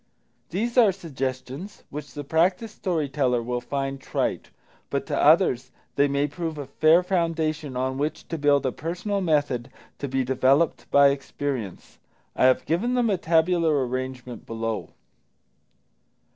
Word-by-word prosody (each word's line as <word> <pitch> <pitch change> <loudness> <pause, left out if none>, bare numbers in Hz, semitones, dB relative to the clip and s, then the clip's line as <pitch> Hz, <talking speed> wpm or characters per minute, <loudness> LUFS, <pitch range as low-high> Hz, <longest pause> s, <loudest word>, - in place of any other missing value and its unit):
These 235 +8 0
are 220 -5 +6
suggestions 135 0 -5
which 150 +1 -8
the 145 - -4
practised 180 +9 +1
story 165 -6 -1
teller 130 -3 +1
will 120 +1 -2
find 135 0 -3
trite. - - -2 0.4
But - - -2
to - - -2
others 125 +1 +4 0.3
they 140 - +4
may 140 +1 +1
prove 160 +1 -5
a 145 - -5
fair 160 +6 +4
foundation 160 -6 -1
on 130 +1 -1
which 150 +2 -3
to 165 - -3
build 145 -1 +3
a 130 - +1
personal 180 - -3
method 145 -7 0 0.3
to 140 - -3
be 135 0 0
developed 135 +5 +2
by 140 0 +6
experience. 135 -6 -4 0.4
I - - +3
have 130 0 +4
given 225 +10 0
them 240 -3 +2
a 195 - +1
tabular 165 -4 +2
arrangement 130 -1 -5
below. 115 -1 -3
145 Hz, 145 wpm, -25 LUFS, 130-170 Hz, 0.4 s, are